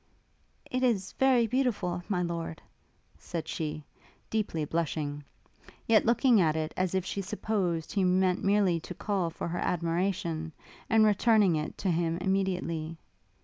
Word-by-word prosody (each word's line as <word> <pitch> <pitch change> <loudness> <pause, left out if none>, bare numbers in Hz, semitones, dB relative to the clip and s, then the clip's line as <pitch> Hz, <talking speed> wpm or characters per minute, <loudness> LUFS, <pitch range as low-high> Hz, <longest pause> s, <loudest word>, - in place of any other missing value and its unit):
'It 255 - 0
is 220 -7 +1
very 260 -3 +4
beautiful, 215 -8 0
My 180 -3 +1
Lord;' 170 -1 -4 0.6
said 165 -2 -5
she, 155 -1 -4 0.5
deeply 200 -8 -1
blushing; 150 -2 -2 0.6
yet 220 -1 +4
looking 235 -2 +4
at 160 -2 +2
it 155 0 -2
as 185 0 0
if 190 -1 0
she 200 - -3
supposed 190 -5 -2
he 195 - +1
meant 185 0 +2
merely 195 -4 +3
to 175 +2 -8
call 195 -4 -1
for 165 - -5
her 175 - -3
admiration, 170 -1 -1 0.4
and 220 -1 +5
returning 210 -3 +4
it 155 0 -3
to 190 - 0
him 165 0 0
immediately. 180 -4 -1
180 Hz, 145 wpm, -29 LUFS, 165-205 Hz, 0.6 s, and